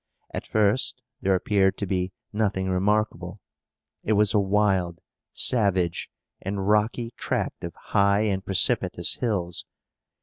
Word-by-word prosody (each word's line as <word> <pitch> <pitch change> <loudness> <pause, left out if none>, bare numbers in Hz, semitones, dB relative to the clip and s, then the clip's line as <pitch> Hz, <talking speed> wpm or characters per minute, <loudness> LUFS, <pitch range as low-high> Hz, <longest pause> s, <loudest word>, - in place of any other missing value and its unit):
At - - -5
first 110 +4 +1 0.2
there 95 -1 +2
appeared 95 0 +1
to 100 - -3
be 90 -1 -2 0.2
nothing 100 -3 0
remarkable. 105 +4 -1 0.6
It 110 - +1
was 105 0 +3
a 105 - +4
wild, 95 -4 +1 0.3
savage, 95 -7 +2 0.3
and 95 0 -3
rocky 110 +3 +1
tract - - -3
of - - -6
high 100 +1 +1
and 100 -3 -1
precipitous 95 -2 +2
hills. 90 -8 -2
100 Hz, 125 wpm, -25 LUFS, 95-105 Hz, 0.6 s, a